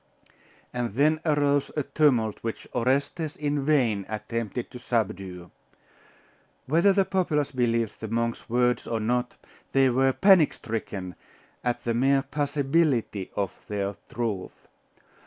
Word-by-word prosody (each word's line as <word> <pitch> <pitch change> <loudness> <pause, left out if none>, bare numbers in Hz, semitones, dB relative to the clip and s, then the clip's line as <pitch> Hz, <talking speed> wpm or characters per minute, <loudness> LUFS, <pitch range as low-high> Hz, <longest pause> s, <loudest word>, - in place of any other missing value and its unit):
And 120 -4 -2
then 155 +4 +3
arose 145 -3 +2
a 150 - +1
tumult, 125 -9 +2
which 115 -1 -5
Orestes 140 +5 0
in 145 -1 -1
vain 125 -9 +2
attempted 110 +2 -4
to 125 - -9
subdue. 95 -7 -3 1.1
Whether 170 +8 +4
the 195 0 +3
populace 155 -7 0
believed 115 -4 0
the 110 - -5
monk's 115 +2 -2
words 125 +1 +1
or 115 - -1
not, 120 +3 -1 0.4
they 135 -1 +4
were 135 +2 +3
panic 190 0 +5
stricken 100 -5 -5 0.5
at 120 -1 -1
the 120 - 0
mere 135 +3 +3
possibility 140 - 0
of 100 -4 -1 0.2
their 100 -1 -2 0.2
truth. 110 -6 -4
125 Hz, 125 wpm, -26 LUFS, 110-145 Hz, 1.1 s, panic